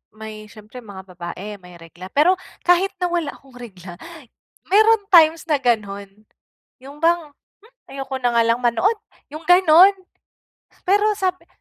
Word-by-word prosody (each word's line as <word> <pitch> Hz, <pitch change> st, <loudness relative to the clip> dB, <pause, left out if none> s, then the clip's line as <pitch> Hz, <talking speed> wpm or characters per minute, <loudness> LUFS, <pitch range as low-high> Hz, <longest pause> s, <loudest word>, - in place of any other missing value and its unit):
may 215 Hz, -1 st, -10 dB
siyempre 215 Hz, +3 st, -13 dB
mga 195 Hz, -3 st, -12 dB
babae, 185 Hz, +4 st, -8 dB
may 180 Hz, -1 st, -15 dB
regla. 170 Hz, +3 st, -13 dB
Pero 315 Hz, +6 st, +3 dB, 0.3 s
kahit 355 Hz, +2 st, +3 dB
na 360 Hz, -, -2 dB
wala 335 Hz, -5 st, -3 dB
akong 270 Hz, -2 st, -21 dB
regla, 190 Hz, -8 st, -12 dB, 0.8 s
meron 435 Hz, +1 st, +4 dB
times 320 Hz, -1 st, +5 dB
na 300 Hz, -4 st, 0 dB
gano'n. 205 Hz, -3 st, -3 dB, 0.6 s
Yung 285 Hz, +3 st, -13 dB
bang, 335 Hz, -3 st, 0 dB, 0.3 s
"Hmm, 450 Hz, -, -23 dB
ayoko 270 Hz, -1 st, -6 dB
na 245 Hz, -1 st, -1 dB
nga 230 Hz, -, +4 dB
lang 230 Hz, +1 st, 0 dB
manood," 250 Hz, -, 0 dB, 0.3 s
yung 310 Hz, +2 st, -9 dB
gano'n. 360 Hz, +2 st, +6 dB, 0.9 s
Pero 415 Hz, +3 st, +2 dB
sabi 370 Hz, -1 st, -3 dB
265 Hz, 145 wpm, -20 LUFS, 210-350 Hz, 0.9 s, gano'n